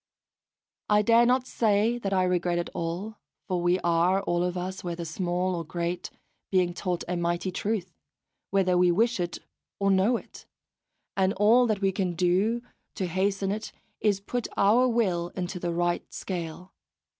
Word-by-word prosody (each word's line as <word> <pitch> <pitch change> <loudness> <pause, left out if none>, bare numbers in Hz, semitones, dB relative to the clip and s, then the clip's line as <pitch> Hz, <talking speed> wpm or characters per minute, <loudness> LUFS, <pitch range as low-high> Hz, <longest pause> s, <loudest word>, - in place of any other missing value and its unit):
I 210 0 +4
dare 235 +2 +5
not 255 +1 +2
say 225 0 +1
that 195 -4 -3
I 185 -1 +3
regret 180 -1 +1
it 175 - -3
all, 180 +6 -4 0.3
for 180 -3 -1
we 175 +1 +3
are 175 +3 +2
all 175 -2 0
of 180 0 -2
us, 185 +2 -4
whether 170 -1 -4
small 180 +2 -1
or 170 -1 -3
great, 170 +2 -3 0.4
being 180 -2 +2
taught 180 -1 -2
a 180 - -1
mighty 175 +2 -1
truth, 190 -2 -2 0.6
whether 190 -2 +2
we 180 0 +5
wish 230 +5 +2
it 175 -1 -2 0.4
or 200 0 +2
know 195 +6 +3
it; - - -13 0.7
and 190 0 +2
all 230 +5 +5
that 210 -3 0
we 195 -1 +2
can 185 -2 -2
do 190 +7 +1 0.3
to 190 - -2
hasten 195 +2 0
it 215 +2 -4 0.3
is 205 -2 +2
to 195 - -21
put 245 -2 -2
our 225 +6 +5
will 190 -8 +1
into 180 0 -4
the 175 -1 -2
right 175 0 -1
scale. 180 0 -6
185 Hz, 170 wpm, -27 LUFS, 175-205 Hz, 0.7 s, dare